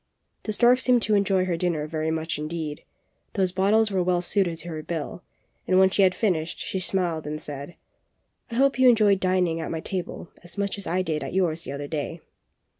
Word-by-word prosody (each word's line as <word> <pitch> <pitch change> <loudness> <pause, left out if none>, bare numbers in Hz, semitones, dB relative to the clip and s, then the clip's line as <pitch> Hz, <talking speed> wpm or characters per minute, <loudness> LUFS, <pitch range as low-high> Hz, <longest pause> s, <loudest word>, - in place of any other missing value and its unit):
The 215 - -1
stork 245 +3 +5
seemed 250 -3 +3
to 215 - +1
enjoy 195 -2 +2
her 180 -2 0
dinner 165 -3 -1
very 155 0 -2
much 160 -1 -2
indeed; 155 -1 -4 0.5
those 190 -2 +1
bottles 210 +4 +3
were 190 -2 +1
well 180 0 +1
suited 180 -3 +2
to 170 +2 -7
her 155 -2 -5
bill, 165 +1 -5 0.5
and 185 - +3
when 190 0 +5
she 200 - +2
had 185 -1 +4
finished, 170 -7 0
she 190 - -3
smiled 175 -4 -1
and 155 +1 -4
said: 145 +2 -8 0.7
hope 265 +3 +2
you 260 -1 +7
enjoyed 210 -4 +4
dining 180 -3 +1
at - - -4
my 165 - -3
table 180 0 -5
as 175 +4 -11
much 200 0 -1
as 200 - -6
I 185 +2 0
did 155 -4 -2
at 135 - -6
yours 170 -3 0
the - - -5
other 140 +1 -5
day." 155 +2 -4
180 Hz, 205 wpm, -25 LUFS, 160-195 Hz, 0.7 s, you